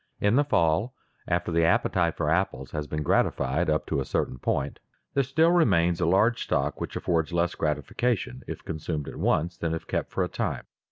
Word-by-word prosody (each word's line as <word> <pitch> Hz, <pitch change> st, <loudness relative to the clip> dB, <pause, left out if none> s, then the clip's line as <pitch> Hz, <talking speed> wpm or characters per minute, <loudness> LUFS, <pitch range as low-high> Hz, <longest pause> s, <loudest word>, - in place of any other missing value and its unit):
In 100 Hz, +3 st, +3 dB
the 145 Hz, -, +5 dB
fall 110 Hz, -, +1 dB, 0.3 s
after -, -, 0 dB
the 85 Hz, 0 st, +2 dB
appetite 85 Hz, 0 st, +2 dB
for 75 Hz, -, -1 dB
apples 80 Hz, -5 st, 0 dB
has 75 Hz, -1 st, -4 dB
been 75 Hz, +1 st, -3 dB
gratified 75 Hz, +3 st, +1 dB
up 75 Hz, 0 st, +1 dB
to 75 Hz, -, -1 dB
a -, -, 0 dB
certain 65 Hz, -, -2 dB
point, 70 Hz, +2 st, -1 dB, 0.3 s
there 140 Hz, -, +3 dB
still 160 Hz, +6 st, +3 dB
remains 90 Hz, -, +3 dB
a 85 Hz, -, +2 dB
large 110 Hz, +7 st, +3 dB
stock 70 Hz, +2 st, -1 dB
which -, -, -4 dB
affords 80 Hz, -1 st, 0 dB
less 85 Hz, 0 st, +1 dB
gratification 75 Hz, -, -1 dB
if -, -, -7 dB
consumed 80 Hz, -2 st, -4 dB
at -, -, -7 dB
once 85 Hz, +3 st, 0 dB
than 80 Hz, -1 st, -1 dB
if 80 Hz, -, -7 dB
kept -, -, -2 dB
for -, -, -1 dB
a -, -, -1 dB
time. -, -, -3 dB
85 Hz, 200 wpm, -27 LUFS, 75-95 Hz, 0.3 s, the